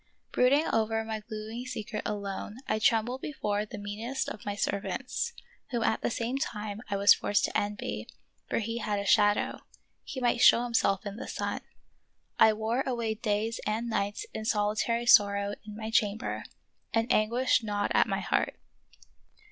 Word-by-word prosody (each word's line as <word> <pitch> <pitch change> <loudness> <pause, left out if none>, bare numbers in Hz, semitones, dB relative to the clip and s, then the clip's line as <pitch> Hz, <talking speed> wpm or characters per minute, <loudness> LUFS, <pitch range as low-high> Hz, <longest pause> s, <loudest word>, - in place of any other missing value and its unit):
Brooding 280 +5 +4
over 225 0 +1
my 220 -1 -4
gloomy 220 +2 -6
secret 220 -4 -4
alone, 205 +1 -4
I 215 - +1
trembled 235 +4 +2
before 210 -8 -2
the 210 - -8
meanest 210 +6 -3
of 205 - -9
my 205 - -1
servants, 205 - -2 0.4
whom 235 -3 -1
at 220 - +1
the - - 0
same 240 +3 -2
time 210 -6 -4
I 200 - 0
was 200 +1 +8
forced 205 - +1
to - - -5
envy, 205 0 -2 0.4
for - - 0
he 230 +1 -2
had 210 -2 -1
a 200 - -3
shadow; 205 0 +3 0.4
he 260 - -6
might 245 -1 +1
show 240 - +7
himself 220 -5 +1
in 200 +1 -5
the - - -6
sun. - - -3 0.8
I 220 - +8
wore 220 +4 -1
away 235 -4 -1
days 220 +1 -1
and 225 +2 -1
nights 205 -1 -1
in 220 - -4
soli 210 -1 +1
tary 235 +2 0
sorrow 200 -3 +5
in 210 0 -8
my 220 0 -5
chamber, 210 -1 0 0.5
and 225 +1 +1
anguish 235 +3 +3
gnawed 205 -2 -1
at - - +4
my - - -1
heart. - - 0
220 Hz, 170 wpm, -29 LUFS, 205-235 Hz, 0.8 s, was